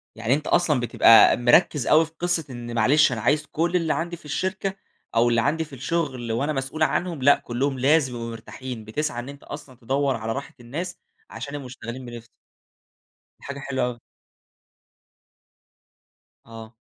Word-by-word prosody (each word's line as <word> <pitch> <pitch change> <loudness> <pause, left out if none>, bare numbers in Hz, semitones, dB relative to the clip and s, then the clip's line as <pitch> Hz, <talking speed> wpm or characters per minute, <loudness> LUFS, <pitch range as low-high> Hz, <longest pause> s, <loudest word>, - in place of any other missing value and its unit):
يعني 115 +3 0
أنت 150 +1 -1
أصلًا 160 -6 +3
بتبقى 115 -1 +6
مركّز 125 +3 +3
أوي 160 +2 +5
في 160 - -14
قصة 175 -2 0
إن 120 -1 -7
معلش 135 +5 +4
أنا 110 -3 -3
عايز 150 +5 +2
كُلّ 170 +4 -1
اللي 165 -3 +2
عندي 170 +1 -3
في - - -19
الشركة 190 +5 -2 0.4
أو 120 +1 +4
اللي 115 -1 +2
عندي 160 +5 0
في 150 - -16
الشُغل 130 -4 -2
وأنا 140 +7 0
مسؤول 135 +4 -2
عنهم، 170 -3 -1
لأ 140 +2 +6
كلّهم 130 +2 -2
لازم 135 -2 +3
يبقوا 115 0 -5
مرتاحين، 115 0 -8
بتسعى 120 +1 -2
إن 125 +3 -7
أنت 140 0 -11
أصلًا 145 -3 -9
تدوّر 135 +2 0
على 115 0 -4
راحة 140 +4 -5
الناس 160 +10 -6 0.3
عشان 140 - -7
يبقوا 140 -2 -6
مشتغلين 125 0 -8
بنِفْس. 120 -1 -9 1.1
دي - - -21
حاجة 140 0 -6
حلوة 130 -2 -1
أوي. 120 -1 -5 2.5
آه. 115 0 -11
135 Hz, 165 wpm, -24 LUFS, 120-155 Hz, 2.5 s, بتبقى